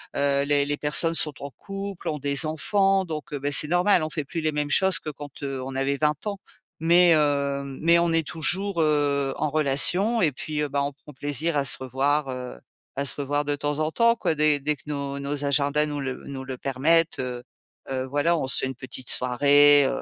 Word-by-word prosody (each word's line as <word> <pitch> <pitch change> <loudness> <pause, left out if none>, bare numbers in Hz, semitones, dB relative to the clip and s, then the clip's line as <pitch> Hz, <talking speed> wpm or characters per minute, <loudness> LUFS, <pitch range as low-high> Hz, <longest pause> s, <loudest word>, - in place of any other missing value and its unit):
heu, 140 0 +1
les 145 0 +2
les 145 0 -2
personnes 165 +3 +1
sont 150 -2 +1
en 140 - -6
couple, 195 - -8
ont 150 -1 -2
des 140 +2 -1
enfants, 195 +5 +1
donc, 155 -2 -7
heu, 145 - -3
beh, 145 +1 -2
c'est 150 - +1
normal. 175 +1 +3
On 155 - -4
fait 155 - -3
plus 165 +4 -5
les 155 0 0
mêmes 145 0 -2
choses 190 +5 +3
que - - -7
quand, 145 -1 -10
heu, 135 -2 -4
on 135 +1 -6
avait 135 +1 -1
20 150 +3 -1
ans. 200 -1 -3 0.4
Mais, 170 +1 +5
heu, 140 -2 0 0.2
mais 170 +1 +5
on 170 0 +1
est 165 -1 +2
toujours, 175 +3 -1
heu, 145 -3 +1
en - - -1
relation 155 - +3
et 160 - +3
puis, 150 +2 -4
heu, 150 - 0
bah, 140 0 -1
on 140 - -2
prend 145 +2 -15
plaisir 145 +4 -2
à 140 - +1
se - - +3
revoir, 135 +3 -1
heu, 125 - -6 0.4
à 140 - 0
se - - -1
revoir 145 +1 -1
de 145 0 -1
temps 145 +1 -3
en 155 0 -1
temps 230 +7 +3
quoi, 165 - -1
dès 150 -1 +3
dès 150 +1 0
que - - -22
nos 140 -1 -4
nos 145 +1 -3
agendas 145 +1 +1
nous 145 -1 -4
le 135 -1 -3
nous 135 -1 -6
le 130 -1 -5
permettent, 150 +6 +1
heu 125 -1 -4 0.5
heu, 130 -1 -2
voilà, 145 +6 +1
on 135 - -2
se - - +5
fait - - -1
une 130 - -5
petite 130 0 -8
soirée, 145 +3 +5
heu - - -3
145 Hz, 230 wpm, -24 LUFS, 140-160 Hz, 0.5 s, Mais